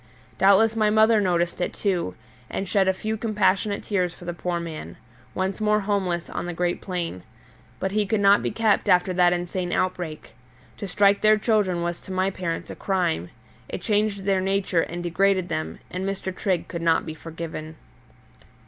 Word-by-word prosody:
Doubtless 200 +4 +5
my 215 -1 +3
mother 220 0 +5
noticed 175 -2 0
it, - - -1
too, 180 - -1 0.3
and 195 - -3
shed 195 0 +2
a - - +5
few 215 +4 -3
compassionate 210 -2 +1
tears 180 -4 -1
for 175 - -12
the 175 - -3
poor 175 0 -2
man, 155 - -7 0.4
once 190 +3 -2
more 210 0 +3
homeless 190 -4 -1
on - - -4
the 175 - -4
great 175 0 -1
plain. 175 - -4 0.6
But 190 - -1
he 210 0 +1
could 220 +1 +1
not 200 0 +5
be - - -1
kept 220 -2 +1
after 180 +1 +4
that 175 -1 +4
insane 175 0 -2
outbreak. 175 -4 -2 0.5
To 200 - -5
strike 200 +1 +3
their 215 0 +5
children 205 -6 +1
was 175 0 -3
to 190 - -10
my 185 +1 +1
parents 175 -3 -4
a - - -7
crime; 175 - -1 0.4
it - - -5
changed 210 -2 +1
their 195 -1 +2
nature 190 -3 +1
and 175 +1 -4
degraded 185 +1 +1
them, 155 -1 -3
and 185 +1 -3
Mr. 190 -1 -3
Trigg 190 -5 -1
could 170 - -5
not 165 -1 +2
be 160 - -5
forgiven. 160 -1 -7
185 Hz, 185 wpm, -24 LUFS, 175-200 Hz, 0.6 s, Doubtless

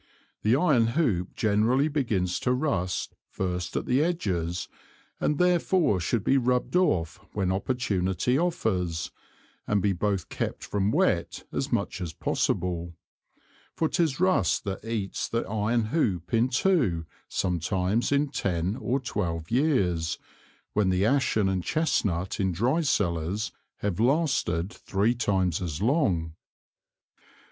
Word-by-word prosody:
The 110 +3 +3
Iron 135 -8 +3
Hoop 100 - +1
generally 110 +7 +2
begins 110 - 0
to 125 - +1
rust 125 - -1 0.2
first 90 -2 -3
at - - -2
the 130 +4 +2
Edges, 90 - -1 0.5
and 150 - +1
therefore 180 - +3
should 100 +5 0
be 135 +4 +3
rubbed 125 +5 0
off 95 - +2 0.2
when 95 -3 0
opportunity 95 0 0
offers, 100 - -1 0.6
and 105 - +2
be 100 0 +1
both 95 -1 -1
kept - - -3
from 100 0 0
wet - - +1
as - - -2
much - - -1
as 85 -3 -4
possible; 85 -1 -1 0.8
for 160 - +1
'tis 155 -5 0
Rust 185 - +2
that 95 0 -4
eats 110 -3 -3
the 115 - -1
Iron 110 +3 +1
Hoop 95 - 0
in 115 +3 +3
two 125 - +2 0.2
sometimes 90 - 0
in 145 0 +2
ten 95 - -1
or 135 0 0
twelve 85 -9 -3
Years, 95 - +1 0.6
when 105 -2 +2
the 95 +2 +2
Ashen 120 -5 +2
and 95 -2 0
Chesnut 100 - 0
in 95 -2 +1
dry 120 - +1
Cellars 85 - 0 0.3
have 100 -2 -1
lasted 120 - +1
three 100 +5 0
times 95 -7 0
as 80 -4 -3
long. 100 - +1
105 Hz, 130 wpm, -27 LUFS, 90-130 Hz, 0.8 s, The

